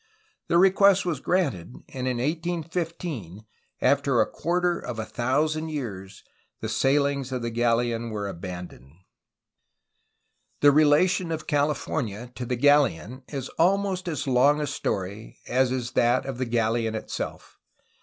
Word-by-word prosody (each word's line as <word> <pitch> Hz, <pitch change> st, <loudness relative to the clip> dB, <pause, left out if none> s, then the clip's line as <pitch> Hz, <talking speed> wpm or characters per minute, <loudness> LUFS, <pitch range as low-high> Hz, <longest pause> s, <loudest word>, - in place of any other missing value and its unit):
The 170 Hz, -, +3 dB
request 195 Hz, +1 st, +5 dB
was 165 Hz, -6 st, -1 dB
granted, 135 Hz, -, -1 dB
and 130 Hz, -1 st, -4 dB
in 125 Hz, -1 st, -1 dB
1815, 160 Hz, -, -3 dB, 0.4 s
after -, -, +3 dB
quarter 175 Hz, +1 st, -1 dB
of 120 Hz, -, -6 dB
a 110 Hz, -, -3 dB
thousand 155 Hz, +8 st, 0 dB
years, 100 Hz, -10 st, -6 dB, 0.4 s
the -, -, -4 dB
sailings 140 Hz, -1 st, +1 dB
of 125 Hz, -2 st, -3 dB
the 120 Hz, -, -2 dB
galleon 120 Hz, 0 st, 0 dB
were 105 Hz, -2 st, -4 dB
aban 90 Hz, -1 st, -6 dB
doned. 65 Hz, +3 st, -18 dB, 1.7 s
The 145 Hz, -, +7 dB
relation 155 Hz, +4 st, +3 dB
of 160 Hz, -1 st, -4 dB
California 140 Hz, -6 st, -1 dB
to 125 Hz, -1 st, -6 dB
the 125 Hz, -, 0 dB
galleon 130 Hz, -, +2 dB
is 135 Hz, -3 st, -5 dB
almost 190 Hz, +1 st, +2 dB
as 155 Hz, -7 st, -2 dB
long 135 Hz, +3 st, +4 dB
a 150 Hz, -, -1 dB
story 100 Hz, -4 st, -4 dB
as 130 Hz, 0 st, +2 dB
is 125 Hz, -1 st, -2 dB
that 120 Hz, 0 st, +2 dB
of 135 Hz, -2 st, -5 dB
the 130 Hz, -, 0 dB
galleon 115 Hz, -1 st, 0 dB
itself. 110 Hz, -, -6 dB
130 Hz, 135 wpm, -25 LUFS, 115-155 Hz, 1.7 s, The